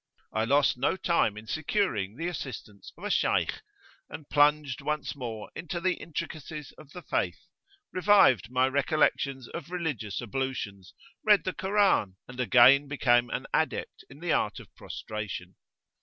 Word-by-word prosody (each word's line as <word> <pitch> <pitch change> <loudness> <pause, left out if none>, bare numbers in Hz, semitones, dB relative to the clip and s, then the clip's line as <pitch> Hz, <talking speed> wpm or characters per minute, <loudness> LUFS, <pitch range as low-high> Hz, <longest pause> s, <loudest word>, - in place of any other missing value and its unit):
I 110 0 +1
lost 140 +1 +3
no 140 +8 +1
time 170 - +1
in 105 - -9
securing 120 - -1
the 165 +6 -3
assistance 120 - -7
of 175 - -14
a 205 - -2
Shaykh,[FN#17] - - +1 0.5
and 145 0 -10
plunged 145 -3 +3
once 150 0 -2
more 115 -5 -6
into 170 +1 -4
the 185 +1 +1
intricacies 155 -3 -6
of 150 -2 -16
the 180 +1 -9
Faith; 90 -3 -2 0.5
revived 185 - +5
my 130 +1 +2
recollections 140 -1 +1
of 170 - -7
religious 150 - -3
ablutions, 120 -6 -4 0.3
read 210 -4 +5
the 185 - -2
Koran, 190 - +2
and 125 0 -11
again 130 +3 +6
became 120 -4 +2
an - - -3
adept - - -1
in 140 +4 -14
the 175 -1 -1
art - - 0
of - - -15
prostration. 100 -4 -6
140 Hz, 150 wpm, -28 LUFS, 120-165 Hz, 0.5 s, again